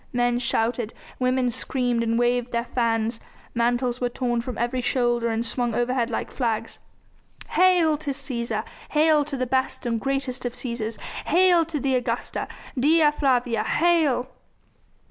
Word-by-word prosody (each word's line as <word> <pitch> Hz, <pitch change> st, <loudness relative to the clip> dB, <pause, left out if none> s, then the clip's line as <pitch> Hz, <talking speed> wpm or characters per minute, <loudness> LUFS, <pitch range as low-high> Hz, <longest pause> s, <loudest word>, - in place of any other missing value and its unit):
Men 245 Hz, 0 st, +1 dB
shouted, 235 Hz, -1 st, 0 dB, 0.2 s
women 255 Hz, -1 st, +1 dB
screamed 245 Hz, -1 st, -1 dB
and 230 Hz, 0 st, 0 dB
waved 245 Hz, 0 st, +1 dB
their 235 Hz, 0 st, 0 dB
fans, 230 Hz, -2 st, 0 dB, 0.3 s
mantles 240 Hz, +1 st, 0 dB
were 245 Hz, -, +1 dB
torn 240 Hz, -1 st, -1 dB
from 245 Hz, -1 st, -6 dB
every 240 Hz, +2 st, -1 dB
shoulder 240 Hz, -2 st, +1 dB
and 225 Hz, 0 st, -1 dB
swung 240 Hz, -1 st, -1 dB
overhead 245 Hz, 0 st, 0 dB
like 230 Hz, -, -3 dB
flags. 230 Hz, -4 st, -2 dB, 0.7 s
"Hail 355 Hz, -4 st, +4 dB
to 300 Hz, -1 st, -5 dB
Cæsar! 235 Hz, -6 st, -2 dB, 0.3 s
Hail 305 Hz, 0 st, +4 dB
to 285 Hz, -1 st, -5 dB
the 255 Hz, -, 0 dB
best 260 Hz, +1 st, -1 dB
and 230 Hz, -2 st, -1 dB
greatest 270 Hz, -2 st, -2 dB
of 245 Hz, -1 st, -3 dB
Cæsars! 235 Hz, -3 st, -4 dB, 0.3 s
Hail 350 Hz, 0 st, +5 dB
to 310 Hz, -2 st, -3 dB
the 270 Hz, 0 st, 0 dB
Augusta! 245 Hz, -1 st, -2 dB, 0.3 s
Dea 305 Hz, +3 st, +5 dB
Flavia, 250 Hz, -6 st, +1 dB
hail!" 305 Hz, -7 st, +2 dB
245 Hz, 145 wpm, -24 LUFS, 235-275 Hz, 0.7 s, Hail